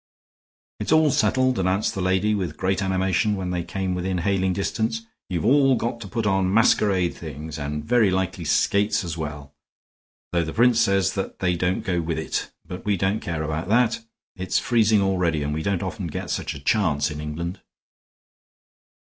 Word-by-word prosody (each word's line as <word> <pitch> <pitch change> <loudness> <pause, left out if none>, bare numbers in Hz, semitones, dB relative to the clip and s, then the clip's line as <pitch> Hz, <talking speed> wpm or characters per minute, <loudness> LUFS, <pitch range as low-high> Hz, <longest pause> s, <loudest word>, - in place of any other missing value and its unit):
"It's - - -3
all 160 -2 +5
settled," 130 -1 +2
announced 95 +3 +1
the 95 - -3
lady, 95 +3 +2
with 90 -7 -3
great 95 +1 0
animation, 95 +2 +1
when 95 -2 -3
they 90 -1 -1
came 95 +1 -3
within 90 +1 -2
hailing 95 +1 +1
distance. 110 +4 -2 0.2
"You've 85 -4 -2
all 135 -1 +5
got 115 0 -3
to 100 - -7
put 110 +4 -3
on 95 -2 +2
masquerade 100 -4 +3
things 75 0 -7
and 75 +1 -4
very 115 +1 +4
likely 95 -1 -1
skates 100 +6 +2
as 85 -2 -4
well, 75 -3 -6 0.8
though 85 -1 +1
the 80 - -5
prince 120 0 +4
says 100 -3 +2 0.2
they 90 -1 0
don't 90 +4 0
go 90 -5 0
with 80 -1 -3
it; 80 - -3 0.2
but 90 +1 -8
we 105 -2 +1
don't 95 +4 0
care 85 -5 -3
about 80 +3 -3
that. 120 +1 +3 0.4
It's 95 -2 -1
freezing 110 -4 +3
already, 90 -6 +1
and 75 +1 -2
we 80 - -2
don't 95 +1 -1
often 95 0 -4
get 80 - -5
such - - -3
a - - -7
chance 75 -2 +1
in 75 0 -6
England." 85 +5 -5
95 Hz, 180 wpm, -24 LUFS, 85-105 Hz, 0.8 s, all